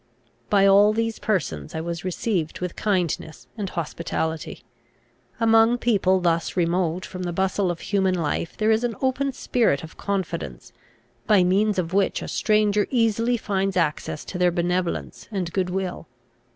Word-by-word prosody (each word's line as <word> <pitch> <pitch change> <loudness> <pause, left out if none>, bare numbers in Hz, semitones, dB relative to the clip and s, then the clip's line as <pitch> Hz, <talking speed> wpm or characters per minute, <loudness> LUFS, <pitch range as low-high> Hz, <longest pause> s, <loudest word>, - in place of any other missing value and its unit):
By 200 -1 +4
all 200 +2 +6
these 225 0 -1
persons 130 - -2
I 160 - -2
was 170 0 -4
received 185 -3 -2
with 180 -1 -4
kindness 175 -6 -1
and 205 -4 -4
hospitality. 160 -1 -4 0.8
Among 225 +1 +5
people 195 -6 +2
thus 170 0 0
remote 175 0 0
from 185 - -7
the 175 -1 -2
bustle 190 +1 0
of 175 -1 -4
human 190 -2 +1
life 165 0 -2
there 215 +1 +2
is 220 +2 +2
an 240 -2 -1
open 270 +1 0
spirit 235 - +1
of 160 - -11
confidence, 170 - -4 0.5
by 200 -4 +5
means 200 +3 +2
of 175 -1 -2
which 195 0 +1
a - - -6
stranger 210 -2 +2
easily 230 0 +2
finds 195 -3 -1
access 155 -2 -1
to 180 - -6
their 180 0 +4
benevolence 175 +1 -2
and 180 -4 -3
good 185 -2 0
will. 180 -3 -3
190 Hz, 155 wpm, -24 LUFS, 170-215 Hz, 0.8 s, all